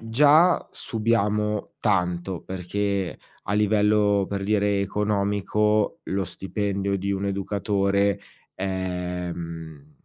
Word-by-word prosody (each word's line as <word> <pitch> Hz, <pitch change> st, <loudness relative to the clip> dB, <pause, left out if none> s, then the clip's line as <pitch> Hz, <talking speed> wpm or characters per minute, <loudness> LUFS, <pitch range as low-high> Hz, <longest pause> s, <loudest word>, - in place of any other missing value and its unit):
già 150 Hz, +10 st, +4 dB
subiamo 105 Hz, -2 st, -1 dB
tanto. 90 Hz, -3 st, 0 dB
Perché, 95 Hz, +1 st, -2 dB, 0.3 s
a 100 Hz, -, -3 dB
livello, 105 Hz, -1 st, +3 dB
per 100 Hz, -1 st, -3 dB
dire, 100 Hz, -1 st, +1 dB
economico, 105 Hz, +1 st, 0 dB
lo 95 Hz, 0 st, -1 dB
stipendio 100 Hz, +2 st, -2 dB
di 100 Hz, +1 st, -1 dB
un 100 Hz, 0 st, -2 dB
educatore, 100 Hz, 0 st, 0 dB, 0.4 s
ehm, 90 Hz, -5 st, -4 dB
100 Hz, 90 wpm, -25 LUFS, 95-105 Hz, 0.4 s, già